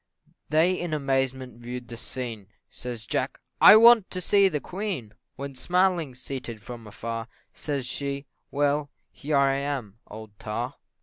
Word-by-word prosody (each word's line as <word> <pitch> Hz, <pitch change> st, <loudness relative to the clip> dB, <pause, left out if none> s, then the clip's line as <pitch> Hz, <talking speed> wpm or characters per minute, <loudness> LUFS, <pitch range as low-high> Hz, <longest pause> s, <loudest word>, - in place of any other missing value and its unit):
They 160 Hz, +4 st, +4 dB
in 175 Hz, -3 st, -2 dB
amazement 130 Hz, -3 st, -1 dB
view'd 120 Hz, 0 st, -6 dB
the 120 Hz, -, -8 dB
scene 115 Hz, -4 st, -5 dB, 0.2 s
Says 120 Hz, -3 st, -6 dB
Jack, -, -, -2 dB, 0.2 s
"I -, -, +11 dB
want 230 Hz, -2 st, +7 dB
to 185 Hz, -, -4 dB
see 200 Hz, +2 st, +4 dB
the 150 Hz, -4 st, -1 dB
Queen!" 180 Hz, -, -4 dB, 0.2 s
When 140 Hz, 0 st, -6 dB
smiling, 175 Hz, -1 st, +1 dB
seated 125 Hz, -4 st, -6 dB
from 120 Hz, -3 st, -9 dB
afar, 115 Hz, +2 st, -5 dB, 0.3 s
Says 140 Hz, -4 st, -3 dB
she 140 Hz, +2 st, -3 dB, 0.2 s
"Well, 145 Hz, 0 st, +1 dB, 0.2 s
here 150 Hz, 0 st, -1 dB
I 135 Hz, 0 st, +3 dB
am, 135 Hz, -7 st, -4 dB
old 110 Hz, 0 st, -10 dB
tar." 120 Hz, +5 st, -3 dB
135 Hz, 145 wpm, -26 LUFS, 120-155 Hz, 0.3 s, I